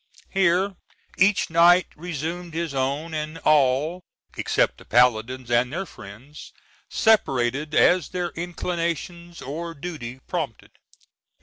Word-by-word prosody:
Here 190 0 +2 0.4
each 195 -3 +3
knight 175 +2 +6
resumed 170 +1 -5
his 165 -3 -2
own, 140 +5 -2
and 155 +1 -4
all, 150 +4 +3 0.3
except - - 0
the - - -15
paladins 125 +1 +2
and 120 +1 +2
their 190 +5 -3
friends, 125 - -12 0.4
separated 145 - +1
as 180 -3 +4
their 180 -1 -3
inclinations 170 0 -4
or 165 +5 -5
duty 140 -6 -7
prompted. 150 - -4
160 Hz, 110 wpm, -24 LUFS, 135-175 Hz, 0.4 s, knight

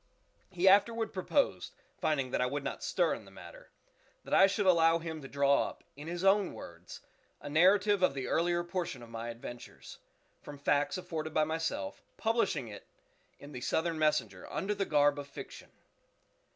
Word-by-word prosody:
He 185 0 0
afterward 225 +3 +4
proposed 235 +9 0 0.2
(finding 135 -5 0
that - - 0
I 125 - +2
would 140 +2 -3
not - - -4
stir - - +1
in - - -7
the - - -15
matter) - - -13 0.5
that - - -6
I 195 - +7
should 200 +1 -1
allow 165 -2 +5
him 160 -2 -6
to 135 - -8
draw 140 0 +2
up, - - -15
in 145 +2 -10
his 175 +2 -4
own 195 -1 +3
words, 85 +1 -11 0.4
a 145 - -8
narrative 195 +5 +4
of 185 -7 +3
the 130 -2 -3
earlier 175 +1 +1
portion 175 -8 -4
of 115 - -13
my 115 +1 -5
adventures, 120 +1 -10 0.4
from 145 - -10
facts 145 +3 +1
afforded 160 -3 -5
by 155 - +4
myself, 160 -11 -3 0.2
publishing 220 - 0
it 105 -2 -11 0.5
in 145 - -12
the 125 -3 -7
"Southern 160 +4 -1
Messenger" 155 -1 0
_under 205 +2 -2
the 195 - -1
garb 145 -1 +3
of 140 - -7
fiction. 140 - -10
160 Hz, 180 wpm, -31 LUFS, 140-185 Hz, 0.5 s, I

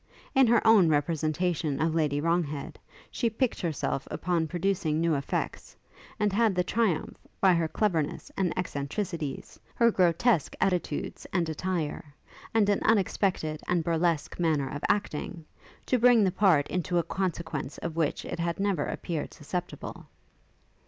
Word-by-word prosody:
In 270 -3 +5
her 230 0 +3
own 215 -7 +6
representation 155 0 0
of 160 +1 +1
Lady 150 -3 +1
Wronghead, 155 -3 -1 0.3
she 235 - 0
piqued 230 +3 -1
herself 155 -5 -2
upon 170 -2 -1
producing 175 -2 0
new 165 0 +2
effects, 140 -1 -3 0.4
and 210 -2 +1
had 220 -2 +3
the 180 - +2
triumph, 200 -5 0 0.2
by 190 -2 +5
her 165 -1 +1
cleverness 165 -5 -1
and 185 -3 0
eccentricities, 155 -2 -4 0.2
her 235 -1 +4
grotesque 180 - +2
attitudes 180 -5 -1
and 175 -2 +1
attire, 160 -3 -3 0.4
and 220 -3 +3
an 205 -1 +2
unexpected 190 -7 +1
and 175 -2 +1
burlesque 165 -1 0
manner 155 -5 +1
of 145 - -5
acting, 175 -5 -2 0.4
to 255 - +1
bring 240 -2 +6
the 190 - +2
part 180 -7 +3
into 180 0 -1
a 170 - +3
consequence 170 -7 -3
of 170 -1 -5
which 160 -3 -1
it - - -5
had 170 +2 -1
never 195 -7 0
appeared 165 -4 -4
susceptible. 175 +4 -6
170 Hz, 145 wpm, -28 LUFS, 155-195 Hz, 0.4 s, own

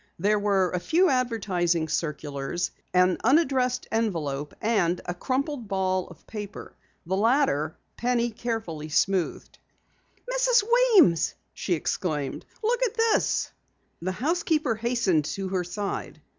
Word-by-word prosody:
There 205 +4 +2
were 195 -3 +2
a 180 - -1
few 340 - +3
advertising 190 -10 0
circulars, 150 0 -2 0.2
an 180 0 +3
unaddressed 260 -2 +2
envelope 160 -11 -2
and 195 -6 +1
a 175 - -2
crumpled 260 - -2
ball 185 -1 0
of - - -15
paper. 210 -2 -8 0.3
The 185 +3 -1
latter, 205 - +2 0.2
Penny 240 -1 +1
carefully 210 -10 -4
smoothed. 185 +3 0 0.7
"Mrs. - - +3
Weems!" 435 - +5 0.2
she 180 - -1
exclaimed. 150 -3 -3 0.2
"Look 480 +2 +1
at 480 -3 +1
this!" 455 -1 +2 0.5
The 185 +2 -2
housekeeper 310 - 0
hastened 225 - +1
to 195 +3 -3
her 185 -1 0
side. 195 +3 -4
205 Hz, 120 wpm, -26 LUFS, 175-255 Hz, 0.7 s, Weems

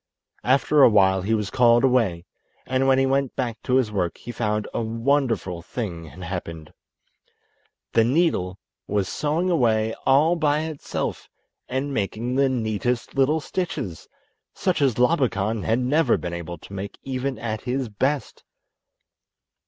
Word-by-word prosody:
After 140 +3 +3
a 135 - +9
while 95 -3 +4
he 110 +4 +1
was 105 -3 -3
called 120 -1 +4
away, 115 -10 +2 0.4
and 130 +1 +1
when 135 -1 +5
he 135 - +3
went 135 -1 0
back 120 -4 -3
to 125 - 0
his 125 -5 +2
work 90 -4 -1
he 120 - -8
found 105 -2 -1
a - - -1
wonderful 115 -5 0
thing 90 -3 -5
had 85 +4 -11
happened! 85 -3 -6 1.2
The 115 - +5
needle 120 - +1 0.3
was 100 -2 0
sewing 160 - -1
away 110 -7 +2
all 150 +6 +5
by 150 -2 +1
itself 155 -2 -4 0.4
and 135 +2 -2
making 115 +3 -2
the 135 +1 +3
neatest 115 0 -1
little 140 +4 +2
stitches, 145 - -4 0.5
such 185 -5 0
as 135 -5 +2
Labakan 115 -6 +1
had 115 - +2
never 135 +2 +2
been 85 0 -5
able 85 0 -6
to 100 - -13
make 100 +1 -6
even 130 -1 -3
at 110 -1 -4
his 130 +1 -2
best. 130 +7 -2
120 Hz, 150 wpm, -24 LUFS, 100-135 Hz, 1.2 s, a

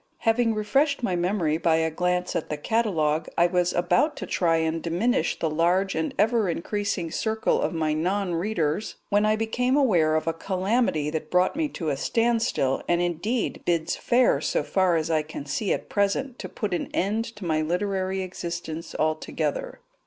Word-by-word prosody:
Having 225 0 +2
refreshed 270 +7 +1
my 185 -6 +1
memory 175 -3 0
by 165 -2 +3
a 160 0 +1
glance 180 +2 -1
at - - -2
the 150 - -2
catalogue, 160 -6 0
I 170 - +5
was 180 0 +1
about 175 - +2
to - - -5
try 165 -2 +1
and 160 0 -1
diminish 195 +11 0
the 165 - -1
large 175 +5 +1
and 160 0 -1
ever 220 -1 +2
increasing 185 0 -2
circle 220 +4 0
of - - 0
my 160 -3 0
non 180 +4 0
readers 170 0 -1
when 205 +1 +3
I 215 - +3
became 250 +4 0
aware 175 - +3
of 155 - 0
a 165 - 0
calamity 185 -3 0
that 155 -1 -4
brought 180 +6 +2
me 315 0 0
to 165 - -4
a 140 - -1
standstill, 230 - +1
and 175 - +2
indeed 175 +7 -1
bids 170 -2 0
fair, 245 +1 +2
so - - 0
far 185 -3 +2
as 160 0 0
I 155 -1 +3
can 150 -2 -8
see 190 +8 -1
at - - -2
present, 215 +6 0
to - - -6
put 210 -5 -3
an 175 - -2
end 210 +4 +1
to 210 -3 -8
my 155 -2 +1
literary 190 +3 -1
existence 170 -2 -6
altogether. 160 - -2
180 Hz, 180 wpm, -25 LUFS, 160-215 Hz, -, I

